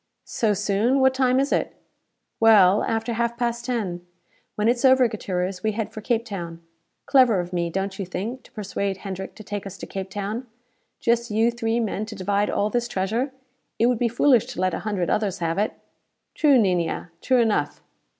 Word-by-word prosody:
"So 215 -3 0
soon? 210 +6 +1
What 265 0 +4
time 260 -1 +2
is 275 +2 0
it?" - - 0 0.6
"Well, 210 -3 +6
after 225 +1 -1
half 235 +1 -1
past 235 -1 -2
ten. 200 -9 -2 0.5
When 210 +1 0
it's 240 +2 +1
over, 260 -1 +6
Gutierrez, 185 -3 -3
we 215 +1 0
head 220 0 -4
for 215 - -7
Cape 230 +1 0
Town. 170 -6 -6 0.5
Clever 255 -8 +5
of 175 +1 -5
me, 170 -1 0
don't 195 +2 -3
you 195 - -2
think, 220 +8 -4
to - - -18
persuade 200 -2 -3
Hendrick 190 -1 -6
to 215 - -11
take 205 -1 -5
us 195 0 -9
to - - -7
Cape 190 -1 -6
Town? 210 +5 -4 0.5
Just 235 0 +1
you 225 +2 +2
three 230 0 -1
men 215 -1 -2
to 225 - -7
divide 200 +1 0
all 210 +1 0
this 240 +1 0
treasure. 225 +7 -1 0.5
It 230 - +3
would 245 -2 +2
be 245 - +2
foolish 240 0 +3
to - - -7
let 185 -1 +1
a - - -2
hundred 200 -5 -2
others 210 -4 0
have 165 +2 -1
it." 210 - 0 0.6
"True, 290 -3 +4
Niña; 180 -5 0
true 255 -1 +3
enough." 225 -3 0
215 Hz, 195 wpm, -24 LUFS, 195-235 Hz, 0.6 s, Well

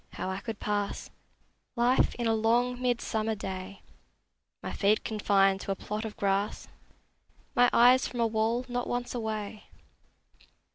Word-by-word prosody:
How 190 - -3
I 190 - -3
could 220 +1 -6
pass 205 -1 -2 0.6
Life 245 +2 +3
in 240 - -3
a 225 - +3
long 240 +3 +1
midsummer 225 -3 0
day, 190 -1 -7 0.8
My - - -4
feet 210 +1 +2
confined 195 -3 +2
to - - -3
a - - 0
plot 210 +3 -5
of 215 - -7
grass, 200 +1 -1 0.9
My 245 0 +6
eyes 250 +2 +6
from 245 - -7
a 230 - +3
wall 225 +2 0
not 245 0 -3
once 245 0 -3
away! 215 -3 -4
220 Hz, 145 wpm, -29 LUFS, 200-240 Hz, 0.9 s, My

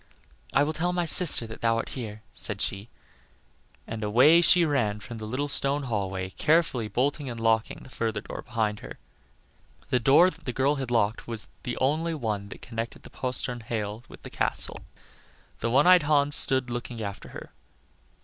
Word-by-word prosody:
"I 140 - +3
will 155 +2 -1
tell 175 +3 -1
my 175 -1 0
sister 165 -7 +6
that 110 -1 -10
thou 115 0 +2
art - - -3
here," 110 -4 -7
said 105 -3 0
she, 100 +3 -2 1.0
and 110 -1 -6
away 130 +11 +5
she 175 0 +5
ran 115 -9 0
from 115 +2 -9
the 110 - -6
little 130 +6 -2
stone 140 0 +1
hallway, 95 -6 -3
carefully 150 - +1
bolting 135 +6 -1
and 115 -1 -6
locking 115 0 0
the - - -14
further 110 -3 -2
door - - -8
behind 105 -3 -2
her. - - -10 0.9
The 125 - +3
door 150 +10 +5
that 165 0 -18
the 125 - -3
girl 140 +3 +1
had 135 -3 -4
locked 115 -2 0
was 115 -2 -2
the 120 - -5
only 160 +5 0
one 105 -7 -3
that - - -11
connected 115 -1 -6
the - - -13
postern 125 -1 -3
hail 110 -1 -5
with - - -14
the - - -9
castle. - - -1 0.8
The 115 - -1
one 130 +7 +4
eyed 180 0 +7
Hans 145 -1 +2
stood 130 -3 +3
looking 120 -1 -5
after 100 -1 -7
her. - - -10
120 Hz, 185 wpm, -26 LUFS, 110-145 Hz, 1.0 s, eyed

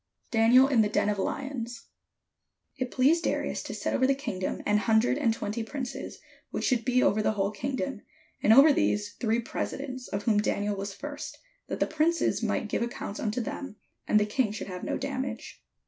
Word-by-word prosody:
DANIEL 240 +3 +6
IN 260 -5 +4
THE 210 - +2
DEN 210 - +1
OF 205 -1 -1
LIONS 245 +1 -4 0.9
It 255 -1 -3
pleased 295 +8 +3
Darius - - -1
to - - -6
set - - -2
over 260 - +3
the 275 - +3
kingdom 190 -9 -4
an 210 0 +3
hun 220 +1 +3
dred 245 +5 +2
and 235 -6 +3
twenty 220 0 -3
princes, 255 +2 -5 0.3
which - - -3
should 245 -4 +2
be 255 +1 +3
over 215 - +3
the 215 - +1
whole 200 -1 0
kingdom; 265 0 -3 0.4
and 215 - +4
over 280 +6 +8
these 205 -5 0
three 230 -1 +1
presidents; 255 +2 -4
of 200 +1 -3
whom 215 -3 +3
Daniel 205 0 0
was 200 0 -4
first: 290 +7 -7 0.3
that - - -4
the - - +3
princes 320 +2 +1
might - - -1
give - - -1
ac 235 0 -2
counts 200 - -5
unto 220 +2 -1
them, 230 0 -5 0.3
and 215 - +5
the 210 - +2
king 215 +1 0
should 215 - -5
have 180 -2 -7
no - - -1
damage. 270 -1 -5
235 Hz, 200 wpm, -28 LUFS, 210-270 Hz, 0.9 s, over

